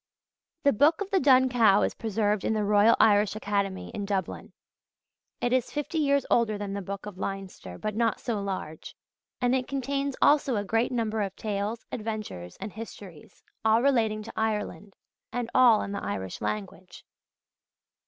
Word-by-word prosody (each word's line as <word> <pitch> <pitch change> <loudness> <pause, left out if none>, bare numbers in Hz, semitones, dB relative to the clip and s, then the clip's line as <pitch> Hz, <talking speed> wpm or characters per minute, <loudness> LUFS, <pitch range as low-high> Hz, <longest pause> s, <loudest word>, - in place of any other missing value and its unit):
The 280 - +4
Book 295 +9 +4
of 400 - -4
the 385 - +3
Dun 260 -2 +5
Cow 225 -5 +4
is - - 0
preserved 210 -2 -1
in 220 - 0
the 215 - 0
Royal 205 +2 +5
Irish 210 -1 +4
Academy 200 -2 -2
in 205 - -5
Dublin. 195 -2 -3 0.9
It 240 - +1
is 255 -2 +1
fifty 295 +2 -3
years 280 -2 +2
older 225 -3 +2
than 205 -1 -5
the 200 - -3
Book 200 +1 -6
of 200 -3 -9
Leinster, 195 - -6
but 215 -1 -4
not 230 -1 +1
so 220 -4 -2
large; 190 -5 -6 0.4
and 245 0 +2
it 255 -1 0
contains 275 0 -2
also 285 -4 +4
a 205 - -1
great 225 +6 +1
number 220 -3 -1
of 195 -1 -3
tales, 210 +2 -3
adventures, 215 - -5
and 200 +1 -6
histories, 200 -7 -11 0.2
all 220 +2 +4
relating 220 -6 +2
to 225 - -9
Ireland, 210 -2 -3 0.4
and 240 -1 -3
all 240 -4 +6
in - - -5
the 200 - -4
Irish 95 -1 -4
language. 185 -3 -5
215 Hz, 170 wpm, -27 LUFS, 200-245 Hz, 0.9 s, all